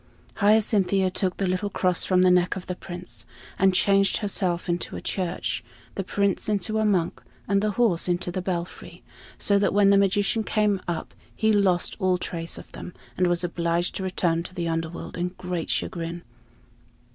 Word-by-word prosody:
Hyacinthia 200 -3 +3
took 185 -1 -1
the 195 - 0
little 185 +3 -1
cross 180 -3 0
from 185 -1 +3
the 185 - +5
neck 180 +1 +3
of 190 - -6
the 180 - -3
Prince, 180 0 -7 0.3
and 190 0 +5
changed 195 +1 +3
herself 190 -4 0
into 175 0 -2
a - - -4
church, 185 -3 -2 0.3
the 195 - -3
Prince 200 +1 0
into 215 +1 0
a 220 - +2
monk, 185 -5 +1 0.3
and 200 0 +2
the 215 - +1
horse 215 -10 +3
into 175 0 -1
the 185 - -3
belfry; 175 -1 -5 0.3
so 200 -1 +2
that 200 -1 +1
when 200 -1 +5
the 200 - +6
magician 200 +3 +2
came 210 -3 +1
up 175 -2 -4 0.2
he 220 -1 +2
lost 190 -4 +2
all 185 -2 +2
trace 165 -1 -4
of - - -11
them, 180 - -9 0.2
and 180 - +2
was 175 0 +1
obliged 170 0 -1
to - - -4
return 175 -3 0
to 185 +2 -9
the 170 -2 -2
Underworld 165 +1 -4
in 180 +1 -2
great 180 -2 -4
chagrin. 170 0 -3
185 Hz, 180 wpm, -25 LUFS, 175-200 Hz, 0.3 s, the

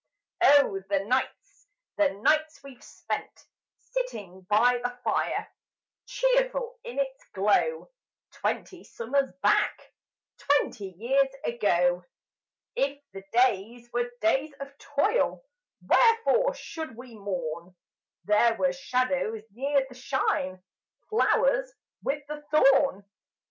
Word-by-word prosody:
Oh, 280 -9 +5
the 200 -1 +2
nights 255 - -3 0.3
the 305 -2 +4
nights 310 0 +2
we've 270 -3 -13
spent, - - -6 0.5
Sitting 210 - -4
by 245 +4 +4
the 245 0 -3
fire, - - -1 0.6
Cheerful - - 0
in 475 - -8
its 270 -1 -2
glow; 210 - +1 0.4
Twenty 365 -3 -3
summers 270 +4 -1
back - - +1 0.5
Twenty 205 -9 0
years 270 +6 +2 0.2
ago! 180 -6 +1 0.7
If 280 +1 0
the 195 0 -9
days 240 0 +1
were 240 0 0
days 265 +8 +2
of 275 0 -8
toil 290 +12 0 0.4
Wherefore 475 +2 +4
should 320 - -7
we 245 -1 -11
mourn; 180 -3 -5 0.5
There 220 +3 +3
were 270 +2 +1
shadows 255 -4 -1
near 275 +4 0
the 260 - -13
shine, 185 -8 -1 0.5
Flowers - - +2 0.3
with 285 0 -2
the 300 0 -7
thorn? 275 -8 +4
265 Hz, 105 wpm, -27 LUFS, 215-305 Hz, 0.7 s, Oh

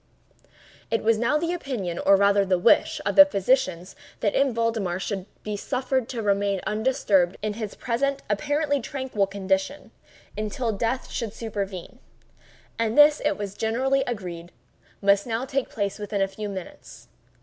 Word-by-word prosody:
It 225 - 0
was 220 0 +3
now 240 +6 +2
the 335 +3 -1
opinion, 235 - -4
or 195 - +5
rather 200 0 +4
the 190 -1 +1
wish, 180 +6 +3
of - - 0
the 290 - +11
physicians, 195 -7 0 0.3
that 205 - +1
M. 275 -1 +3
Valdemar 225 -6 -1
should 195 -1 -4 0.2
be 210 -1 -3
suffered 255 +2 -2
to 235 -3 -4
remain 200 -1 +1
undisturbed 210 -5 +1
in 215 -1 -1
his 215 -1 -6
present 275 +3 -1
apparently 290 -1 0
tranquil 260 -8 -2
condition, 195 +6 -2 0.4
until 215 +3 -2
death 230 +5 -2
should 225 -3 -3
supervene—and 215 +2 -6
this, 295 0 +7
it 300 0 +1
was 200 -2 -5
generally 260 +6 +1
agreed, 180 -7 -5 0.5
must 200 +2 +3
now 230 +2 -2
take 270 -1 -2
place 200 -1 -3
within 205 0 -3
a - - +1
few 205 +2 -6
minutes. 190 -3 -9
215 Hz, 150 wpm, -25 LUFS, 195-260 Hz, 0.5 s, the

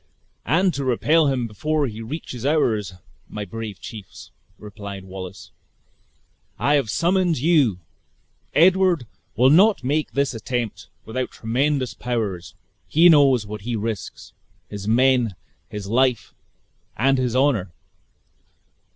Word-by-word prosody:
"And 175 - +2
to 140 - -3
repel 150 +5 +2
him 130 -3 0
before 150 +8 -1
he 110 -3 -6
reaches 125 -1 -7
ours, 110 - 0 0.3
my 105 -1 -5
brave 110 -2 -7
chiefs," 105 -4 -11 0.3
replied 100 -2 -9
Wallace, 95 0 -9 1.1
"I 145 - +1
have 140 -6 +1
summoned 175 - +1
you! 140 - +3 0.8
Edward 180 -3 +4 0.3
will 130 +3 +5
not 195 0 +5
make 150 +4 -1
this 140 -1 0
attempt 120 -1 -4 0.2
without 125 +3 -3
tremendous 130 +3 -1
powers. 105 -8 -4 0.3
He 170 +3 +5
knows 135 -8 +5
what 105 0 -7
he 120 +3 -3
risks; 110 -2 -5 0.4
his 100 -1 -7
men, 125 -2 +3 0.3
his 105 -1 -6
life, 125 +4 +1 0.6
and 135 +2 +2
his 125 -2 -1
honor. 130 - +1
125 Hz, 120 wpm, -22 LUFS, 105-145 Hz, 1.1 s, will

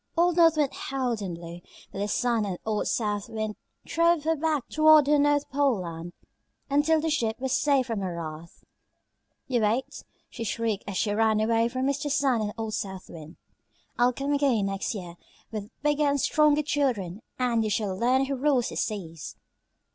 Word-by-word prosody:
Old 345 0 +3
North 330 -2 +5
Wind 290 -3 +1
howled 255 -5 -2
and 185 -4 -4
blew, 170 +1 -9 0.3
but - - -7
the 205 - -1
Sun 235 +1 +1
and 190 -3 -3
old 215 -1 -1
South 210 -2 -1
Wind 215 -1 -3 0.3
drove 335 -2 +2
her 325 +1 +1
back 310 -3 -1
toward 310 -1 +6
her 295 +1 +3
North 290 0 +2
Pole 275 -7 +2
Land 170 0 -7 0.6
until 300 +3 +3
the 320 +1 -1
ship 230 -7 -1
was 265 0 -2
safe 280 -2 +2
from 225 -3 -3
her 185 -3 -3
wrath. 165 0 -8 0.8
"You 250 -4 0
wait," 245 +7 -1 0.2
she 230 - -7
shrieked 225 -2 -2
as 195 -2 -3
she 205 -2 0
ran 220 0 +2
away 225 +1 +2
from 255 +2 -2
Mr. 280 +1 -1
Sun 270 -4 +2
and 210 -1 -2
old 220 -1 -4
South 190 -3 -5
Wind. 160 0 -11 0.6
"I'll 245 +1 +5
come 275 +3 -2
again 270 -8 +2
next 195 +3 -2
year 175 -3 -8 0.3
with 210 -2 -5
bigger 295 0 +1
and 285 0 +1
stronger 300 +1 +3
children 240 - -1 0.2
and 240 -3 +1
you 215 - -1
shall 200 -2 -1
learn 255 +6 +2
who 275 - -3
rules 265 -2 +1
the - - -7
seas." 165 -8 -4
235 Hz, 185 wpm, -27 LUFS, 205-285 Hz, 0.8 s, toward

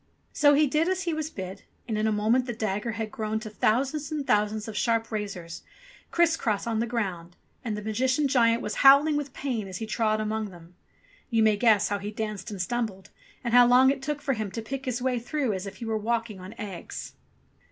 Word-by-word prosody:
So 290 -1 +5
he 300 +1 +5
did 305 +4 +1
as 375 0 -1
he 340 -2 -1
was 315 0 -3
bid, 190 - -7 0.3
and 220 - -2
in 215 +1 +1
a - - +2
moment 225 +5 +2
the 240 - -2
dagger 215 +1 -2
had 220 -1 -4
grown 215 0 -2
to 215 -1 -7
thousands 270 +8 0
and 300 -2 -2
thousands 210 0 +1
of 220 - -6
sharp 230 -1 0
razors, 195 -6 -5 0.5
criss 340 -1 +3
cross 215 -9 -1
on 225 -2 -1
the 235 - 0
ground, 185 -7 -3 0.3
and 220 -4 -3
the 210 - -6
Magician 255 +7 +1
giant 235 -3 +3
was 210 - -3
howling 280 +3 +7
with 290 -2 -2
pain 250 -7 -3
as 185 -2 -6
he 225 - -4
trod 215 0 0
among 215 0 -2
them. 175 -1 -15 0.6
You 225 -3 +3
may 215 -1 +4
guess 210 -2 +3
how 205 0 -1
he 205 +1 -5
danced 215 -1 -4
and 205 -3 -6
stumbled 210 -1 -3 0.3
and 235 -1 -2
how 245 0 +8
long 255 +2 +6
it 275 -1 -4
took 295 0 -3
for 275 -3 +1
him 215 -4 -3
to 225 - -3
pick 270 +4 -5
his 250 -1 -2
way 255 -2 +1
through 250 0 -1
as 190 +1 -4
if 195 - -8
he 230 - -7
were 220 -1 -1
walking 225 -2 -2
on 185 +4 -10
eggs 200 -5 -7
225 Hz, 225 wpm, -27 LUFS, 210-260 Hz, 0.6 s, how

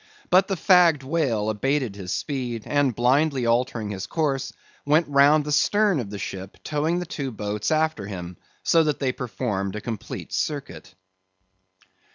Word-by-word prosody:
But 185 +2 +5
the 195 - -1
fagged 175 -5 +4
whale 130 -8 0
abated 130 0 -1
his 95 -3 -6
speed, 125 -6 -3
and 145 -5 +1
blindly 130 +2 +2
altering 115 -2 0
his 95 -2 -5
course, 135 -4 -1 0.3
went 155 +3 +3
round 145 +1 +4
the 150 - -3
stern 200 +4 +3
of 115 -5 -4
the 100 - -6
ship 95 0 -7
towing 155 +3 0
the 180 - -3
two 140 -5 -4
boats 105 -3 -3
after 155 -9 0
him, 90 -3 -7 0.3
so 165 -1 +4
that 150 -2 0
they 135 -2 0
performed 105 -6 -3
a - - -3
complete 110 -2 -6
circuit. 140 -10 -4
135 Hz, 160 wpm, -24 LUFS, 105-155 Hz, 0.3 s, But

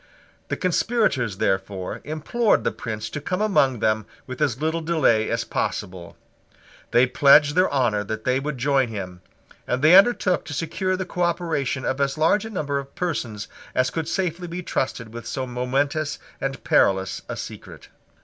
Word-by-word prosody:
The - - -2
conspirators, 180 - +1
therefore, 95 -1 -2
implored 155 +10 +1
the - - +1
Prince 110 -2 -5
to 150 - -5
come 180 +5 -2
among 140 - +2
them 110 -1 +1 0.2
with 130 +1 -8
as 135 -5 +1
little 160 +2 -1
delay 155 -10 +2
as - - 0
possible. 90 -2 -4 0.7
They 120 +2 +5
pledged 145 +3 +5
their 185 +3 +3
honour 120 -7 +1
that 110 +2 -5
they 130 +1 +1
would 145 0 -4
join 135 0 +2
him; 95 -5 -7 0.5
and 125 +2 -1
they 155 +3 +7
undertook 195 -2 +4
to 145 - -6
secure 185 +4 -1
the 190 - -3
cooperation 170 -7 -1
of 130 +2 -1
as 140 +1 0
large 165 +7 +3
a - - -6
number 145 -9 -2
of 140 0 -10
persons 125 - -3 0.3
as 130 0 +2
could 165 -2 -3
safely 180 -2 -2
be 175 +2 -5
trusted 115 -7 -3
with 120 0 -7
so 130 -2 -3
momentous 135 +5 -1 0.2
and 135 0 -4
perilous 95 -1 +2
a - - -4
secret. - - -9
140 Hz, 170 wpm, -23 LUFS, 120-165 Hz, 0.7 s, they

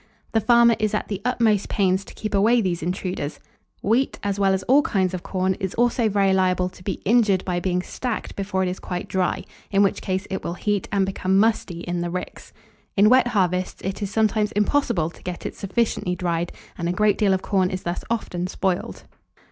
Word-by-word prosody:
The 225 - +2
farmer 235 +1 +5
is 215 -1 0
at - - -3
the 200 -2 -3
utmost 225 -4 +1
pains 190 -1 +1
to - - -13
keep 215 - -5
away 220 +5 +4
these 180 -5 -1
intruders. 180 -3 -3 0.4
Wheat, 235 +6 +1
as 200 0 -1
well 195 -1 +3
as 190 0 0
all 275 +4 +5
kinds 190 -8 0
of 185 - -3
corn, 185 +1 0
is 190 -1 -3
also 240 -1 +2
very 195 -1 +2
liable 185 -1 +2
to 180 0 -16
be 195 -1 -4
injured 210 -4 +3
by 180 -1 -1
being 180 0 -1
stacked 245 +2 -4
before 190 -1 -1
it - - 0
is 180 +1 -3
quite 180 -1 -5
dry; 185 -2 0 0.3
in 200 0 +3
which 195 - +1
case 190 0 -2
it 190 - -3
will 170 - -3
heat, 205 +1 -1
and 195 -1 +2
become 190 0 0
musty 200 -5 +1
in 175 0 -3
the 175 - -2
ricks. 180 +1 -6 0.5
In 205 +2 +6
wet 255 0 +5
harvests 185 -5 0
it 190 +2 -4
is 200 - -2
sometimes 215 0 +1
impossible 210 - +1
to - - -18
get 180 -1 -6
it - - -3
sufficiently 200 -3 -1
dried, 170 -1 -1 0.3
and 170 0 -1
a - - 0
great 210 +1 +2
deal 205 -3 +3
of 185 - -4
corn 190 -3 +1
is 185 0 -4
thus 175 +1 -3
often 180 -6 -2
spoiled. 185 -1 -2
195 Hz, 210 wpm, -23 LUFS, 180-215 Hz, 0.5 s, In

